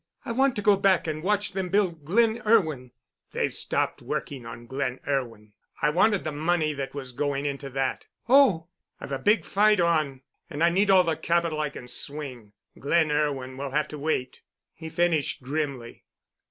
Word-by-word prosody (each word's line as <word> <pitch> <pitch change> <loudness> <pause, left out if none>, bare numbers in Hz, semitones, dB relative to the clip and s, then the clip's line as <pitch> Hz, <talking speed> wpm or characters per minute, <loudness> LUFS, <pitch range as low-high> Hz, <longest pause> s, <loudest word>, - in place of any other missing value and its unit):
"I - - -3
want 265 +2 +2
to 210 - -3
go 205 -3 +5
back 195 -2 +3
and 155 -1 -3
watch 205 +3 0
them 190 -2 -3
build 175 -6 0
'Glen 225 +6 +2
Irwin.'" 160 - +2 0.4
"They've - - -1
stopped - - -1
working 130 -5 -5
on 115 0 -9
'Glen 130 0 -3
Irwin.' 115 -7 -3 0.3
I 150 - +2
wanted 200 +4 +3
the 155 - -3
money 155 +1 0
that 140 -1 -5
was 135 -3 -5
going 140 +2 -2
into 140 -1 -4
that." 135 0 -2 0.2
"Oh!" 240 -11 +5 0.3
"I've - - -8
a 135 - -2
big 210 +10 +2
fight 210 0 +3
on, 155 -6 +1 0.3
and 155 0 -2
I 170 - +5
need 195 +3 +2
all 190 -1 +7
the 165 -2 0
capital 170 -1 0
I 150 -1 0
can 125 -3 -10
swing. 130 -7 -5 0.3
'Glen 155 +2 +2
Irwin' 135 -3 -1
will 140 0 -4
have 150 +3 0
to 150 - -7
wait," 140 -4 -2 0.3
he 160 -1 -9
finished 160 -5 0
grimly. 135 -4 -4
155 Hz, 180 wpm, -26 LUFS, 135-185 Hz, 0.4 s, all